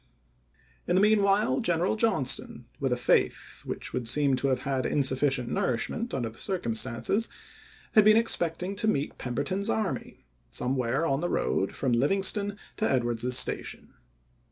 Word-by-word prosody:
In - - +1
the 190 - +4
mean 210 0 +4
while 195 -9 +2
General 175 +3 +1
Johnston, 220 - 0
with - - -1
a - - +1
faith - - 0
which - - -5
would 120 - -2
seem 140 +2 +3
to 140 - 0
have 130 -2 0
had 135 -1 -1
insufficient 130 -2 +1
nourish 120 -2 -1
ment 235 +2 -4
under 120 -4 -2
the - - -16
circumstances, 120 - -1 0.6
had 215 - +6
been 215 +1 +6
expecting 180 -4 +1
^SraSve - - -11
to 220 - 0
meet 145 -9 -1
Pemberton's 145 - -2
army 220 -3 -3 0.2
somewhere 130 +3 -1
on 135 -1 0
the 175 - -1
road 95 - 0
ofoUerta - - -13
ry - - -14
from 130 -3 0
Livingston 195 - +1 0.2
to 220 - 0
Edwards's 120 -1 +1
Station. - - 0
145 Hz, 165 wpm, -27 LUFS, 125-200 Hz, 0.6 s, had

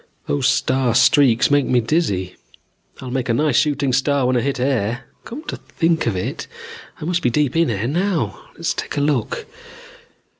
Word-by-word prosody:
Those 140 -2 0
star 130 -2 +1
streaks 135 -2 +4
made 145 -2 +3
me 125 - +3
dizzy. 105 - -1 0.7
I'll 130 - -6
make 130 -1 -2
a 115 - +2
nice 150 -1 +1
shooting 140 -2 +1
star 135 +1 +2
when 130 0 +2
I 120 - +2
hit 140 +1 -2
air. 125 -2 0 0.2
Come 275 +7 -8
to - - -5
think 165 -4 -1
of 110 - 0
it, 90 - -4 0.5
I - - -6
must 175 +1 0
be 125 - +2
deep 145 +3 0
in 165 0 +3
air 110 0 -1
now. 160 - -2
Let's - - -1
take - - -5
a - - +2
look. 290 - -1
135 Hz, 185 wpm, -20 LUFS, 120-150 Hz, 0.7 s, streaks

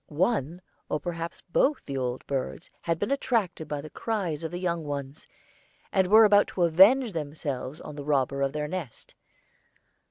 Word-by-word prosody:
One, 175 - -1 0.3
or 150 - 0
perhaps 165 -1 -5
both 265 - +1
the 140 - -5
old 125 -1 -3
birds 140 +4 -4
had 165 -1 -1
been 210 - -2
attracted 225 - 0
by 145 -1 -3
the 155 - -9
cries 185 -9 -2
of 160 - -2
the 175 - -5
young 170 -2 -1
ones, 140 0 -6 0.6
and 190 -2 +3
were 220 +3 +8
about 205 -1 +5
to 180 - -1
avenge 200 +8 +6
themselves 150 -2 -4
on 150 - -9
the 145 - -6
robber 140 -1 0
of 135 -1 +1
their 150 0 -3
nest. 165 -8 -7
165 Hz, 170 wpm, -27 LUFS, 145-185 Hz, 0.6 s, were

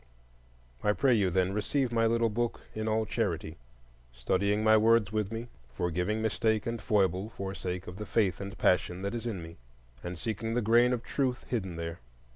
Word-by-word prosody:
I 105 - +3
pray 130 +3 +3
you, 100 -5 +3
then, 95 +1 +1
receive 120 +5 0
my 115 -1 +3
little 115 0 +2
book 120 +2 -1
in 110 0 -3
all 110 0 +1
charity, 95 -8 -2 0.5
studying 100 - 0
my 110 0 +6
words 110 -1 +4
with 105 -1 -1
me, 115 +1 -4 0.3
forgiving 90 +6 -1
mistake 110 -1 +1
and 115 -1 -3
foible 95 -1 +1
for 95 -3 -5
sake 90 -1 -4
of 90 +1 -8
the 105 0 -6
faith 100 -3 +1
and 100 +2 -6
passion 90 0 +1
that 100 - -2
is 120 0 -3
in 95 -7 -4
me, 80 0 -10 0.5
and 90 0 -5
seeking 115 +4 -3
the 120 - +2
grain 120 +3 +5
of 120 -2 -1
truth 130 -2 -1
hidden 95 -8 -2
there. 85 0 -5
105 Hz, 190 wpm, -30 LUFS, 95-115 Hz, 0.5 s, my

